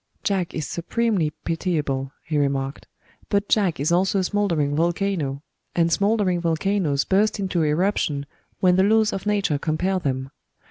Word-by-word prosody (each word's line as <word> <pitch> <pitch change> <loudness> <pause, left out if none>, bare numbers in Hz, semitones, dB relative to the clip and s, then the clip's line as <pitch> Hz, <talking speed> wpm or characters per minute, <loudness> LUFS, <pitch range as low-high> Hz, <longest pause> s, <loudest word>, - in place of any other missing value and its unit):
"Jack 190 -4 -1
is 155 - -3
supremely 190 -1 0
pitiable," 150 -6 -1
he 155 - -4
remarked; 140 -1 -1 0.4
"but 200 0 +1
Jack 190 -8 +2
is 145 +4 0
also 185 +3 +2
a 190 - +2
smoldering 170 -8 0
volcano 165 -4 -1 0.3
and 170 -1 +2
smoldering 200 -1 +2
volcanos 165 -3 0
burst 205 +2 +2
into 185 -3 0
eruption 150 -2 0 0.4
when 180 -1 +4
the 190 - +5
laws 220 +1 +3
of 195 +1 -4
nature 200 -8 +1
compel 180 +5 0
them. 135 -4 -3
175 Hz, 145 wpm, -23 LUFS, 150-200 Hz, 0.4 s, the